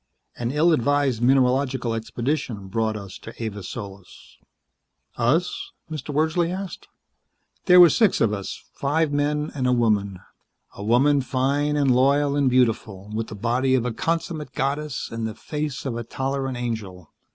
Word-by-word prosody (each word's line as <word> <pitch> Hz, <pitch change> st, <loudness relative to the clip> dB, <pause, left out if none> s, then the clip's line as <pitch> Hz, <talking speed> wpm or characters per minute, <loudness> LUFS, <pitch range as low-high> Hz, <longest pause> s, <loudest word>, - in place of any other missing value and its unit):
An 120 Hz, -1 st, -3 dB
ill 155 Hz, +5 st, +3 dB
advised 140 Hz, -3 st, +1 dB
mineralogical 130 Hz, -1 st, +2 dB
expedition 115 Hz, -2 st, -3 dB
brought 110 Hz, +1 st, -1 dB
us 100 Hz, -3 st, -9 dB
to 110 Hz, -, -10 dB
Avis 105 Hz, -5 st, -5 dB
Solis." 100 Hz, -4 st, -10 dB, 0.8 s
"Us?" 175 Hz, -, 0 dB, 0.2 s
Mr. 150 Hz, -2 st, -5 dB
Wordsley 160 Hz, +4 st, +1 dB
said. 185 Hz, +1 st, -6 dB, 0.8 s
"There 180 Hz, -1 st, +7 dB
were 175 Hz, -2 st, +9 dB
six 220 Hz, -5 st, +3 dB
of 110 Hz, -2 st, +2 dB
us, 100 Hz, -2 st, -5 dB
five 150 Hz, +2 st, 0 dB
men 150 Hz, +1 st, 0 dB
and 130 Hz, -3 st, -1 dB
a -, -, +3 dB
woman. 105 Hz, -6 st, +1 dB, 0.5 s
A 100 Hz, -, -8 dB
woman 135 Hz, +6 st, +3 dB
fine 140 Hz, +3 st, 0 dB
and 140 Hz, -3 st, +3 dB
loyal 140 Hz, +2 st, +3 dB
and 140 Hz, -2 st, +3 dB
beautiful, 110 Hz, -5 st, 0 dB
with 110 Hz, +1 st, -2 dB
the 110 Hz, -, -8 dB
body 125 Hz, +5 st, +1 dB
of 125 Hz, -2 st, 0 dB
a 125 Hz, -, -2 dB
consummate 165 Hz, +3 st, -2 dB
goddess 145 Hz, 0 st, -2 dB
and 115 Hz, -1 st, -3 dB
the 110 Hz, -, -6 dB
face 150 Hz, -4 st, -4 dB
of 130 Hz, -4 st, -2 dB
a 120 Hz, -, -4 dB
tolerant 135 Hz, +1 st, -3 dB
angel. 105 Hz, -8 st, -5 dB
130 Hz, 155 wpm, -24 LUFS, 115-145 Hz, 0.8 s, were